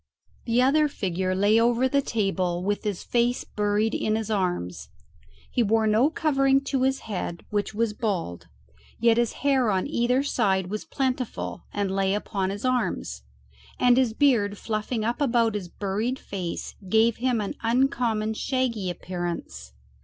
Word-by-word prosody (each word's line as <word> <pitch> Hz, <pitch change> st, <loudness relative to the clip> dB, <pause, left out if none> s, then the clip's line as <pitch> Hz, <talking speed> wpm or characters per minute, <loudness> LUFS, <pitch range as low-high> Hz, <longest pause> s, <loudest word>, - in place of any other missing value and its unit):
The 235 Hz, +1 st, +3 dB
other 300 Hz, +3 st, +4 dB
figure 185 Hz, -7 st, -2 dB
lay 205 Hz, +4 st, +4 dB
over 240 Hz, +2 st, +3 dB
the 280 Hz, +2 st, +2 dB
table 190 Hz, -7 st, -1 dB
with 205 Hz, +2 st, -1 dB
his 205 Hz, -4 st, -2 dB
face 240 Hz, +1 st, +1 dB
buried 210 Hz, +1 st, 0 dB
in 215 Hz, -, 0 dB
his 220 Hz, -1 st, -3 dB
arms. 175 Hz, -, -2 dB, 0.6 s
He 245 Hz, -, +1 dB
wore 225 Hz, 0 st, +2 dB
no 220 Hz, +6 st, +4 dB
covering 275 Hz, -4 st, +2 dB
to 275 Hz, -1 st, -1 dB
his 265 Hz, +1 st, +1 dB
head, 180 Hz, -5 st, -5 dB
which 205 Hz, 0 st, -1 dB
was 225 Hz, -1 st, 0 dB
bald, 190 Hz, -, -3 dB, 0.5 s
yet 230 Hz, 0 st, +4 dB
his 240 Hz, -1 st, +1 dB
hair 265 Hz, -5 st, +3 dB
on 190 Hz, -2 st, +1 dB
either 250 Hz, -1 st, +1 dB
side 190 Hz, -9 st, 0 dB
was 215 Hz, -, -4 dB
plentiful 255 Hz, -3 st, -3 dB
and 200 Hz, -2 st, -1 dB
lay 195 Hz, 0 st, +1 dB
upon 195 Hz, -2 st, -2 dB
his 200 Hz, +4 st, -4 dB
arms, 215 Hz, -, -1 dB, 0.6 s
and 245 Hz, -1 st, +5 dB
his 250 Hz, -3 st, +2 dB
beard 225 Hz, -8 st, +3 dB
fluffing 215 Hz, +1 st, -2 dB
up 235 Hz, +5 st, -1 dB
about 235 Hz, -5 st, +2 dB
his 200 Hz, -4 st, -4 dB
buried 210 Hz, +8 st, -2 dB
face 185 Hz, -8 st, -5 dB, 0.2 s
gave 220 Hz, +2 st, +3 dB
him 245 Hz, -1 st, +1 dB
an 205 Hz, -, -3 dB
uncommon 230 Hz, -3 st, +1 dB
shaggy 230 Hz, -5 st, -1 dB
appearance. 175 Hz, -, -5 dB
220 Hz, 155 wpm, -25 LUFS, 195-250 Hz, 0.6 s, and